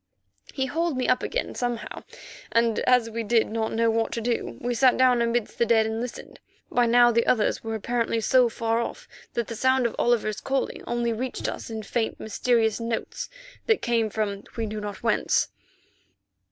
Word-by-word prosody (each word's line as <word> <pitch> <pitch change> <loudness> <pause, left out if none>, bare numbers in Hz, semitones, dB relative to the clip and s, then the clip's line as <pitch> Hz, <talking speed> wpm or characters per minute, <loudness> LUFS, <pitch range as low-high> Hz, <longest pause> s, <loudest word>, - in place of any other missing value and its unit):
He 265 - -1
hauled 325 +2 -1
me 255 - 0
up 255 - +3
again - - -2
somehow, 245 -2 -4 0.5
and, 230 -1 +2
as 250 -2 +4
we 230 +1 -3
did 225 +1 +2
not 220 0 -1
know 230 0 +2
what 225 0 0
to - - -2
do, 235 +1 -2
we 245 +1 -2
sat 255 +1 +4
down 255 -2 +4
amidst 235 -1 -1
the 235 - +4
dead 225 -1 +4
and 220 +1 -2
listened. 245 0 -7 0.3
By 245 -1 +3
now 240 +1 +6
the 235 0 +1
others 220 -4 +2
were 225 0 -3
apparently 230 +1 -1
so 250 +2 +4
far 230 0 -1
off 235 - -5 0.3
that 235 - 0
the 230 - -6
sound 260 +2 +2
of 235 - -1
Oliver's 225 -3 +1
calling 270 0 -2
only 235 -1 0
reached 250 +3 -3
us - - -5
in 220 -1 -5
faint, 225 +2 -2
mysterious 225 0 +1
notes 230 - -4 0.4
that 445 -2 +2
came 230 -2 +1
from 205 -2 -2
we 225 - -1
knew 215 0 -5
not 205 -1 -6
whence. 230 - +2
235 Hz, 190 wpm, -25 LUFS, 225-245 Hz, 0.5 s, now